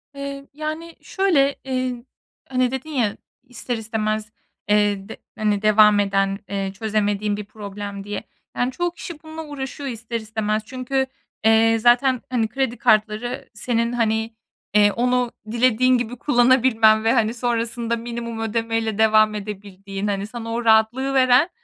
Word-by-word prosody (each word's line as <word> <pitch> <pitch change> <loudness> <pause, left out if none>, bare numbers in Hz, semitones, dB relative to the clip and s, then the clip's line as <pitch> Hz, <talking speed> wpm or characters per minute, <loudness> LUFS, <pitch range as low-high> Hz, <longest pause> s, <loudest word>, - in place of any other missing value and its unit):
Eee, 280 0 -6
yani, 310 +2 -5
şöyle, 305 -8 +2
iii, 255 -2 -3 0.4
hani, 255 -1 +1
dedin 265 +4 -5
ya 240 -9 0 0.3
ister 245 0 -5
istemez, 215 -1 -2 0.4
eee, 205 -1 +2
de - - -8 0.2
hani, 210 -2 +1
devam 215 -1 +5
eden, 195 0 +1
eee, 195 -1 -2
çözemediğin 205 0 -1
bir 210 - -6
problem 205 -1 -7
diye. 205 0 -5 0.3
Yani, 245 +1 0
çoğu 350 +5 -1
kişi 335 -2 -9
bununla 315 0 -7
uğraşıyor 280 -1 -6
ister 230 0 -4
istemez. 215 -1 -2
Çünkü, 260 +2 -1 0.4
eee, 225 0 +5
zaten, 245 +2 +4
hani, 240 -3 +1
kredi 245 +1 -2
kartları 215 +3 +1
senin, 235 +2 -1
hani, 225 -1 0 0.4
eee, 205 0 +5
onu 245 +1 +1 0.2
dilediğin 255 +1 +3
gibi 240 +1 -4
kullanabilmen 240 -4 +4
ve, 225 - +3
hani, 225 -3 +2
sonrasında 235 -1 -1
minimum 235 0 -5
ödeme 225 +1 -1
ile 220 -2 -3
devam 215 -1 +4
edebildiğin, 200 -1 -6
hani, 200 0 -2
sana 230 0 -6
o 235 0 -3
rahatlığı 225 +5 +3
veren 260 +4 +5
230 Hz, 145 wpm, -22 LUFS, 215-255 Hz, 0.4 s, devam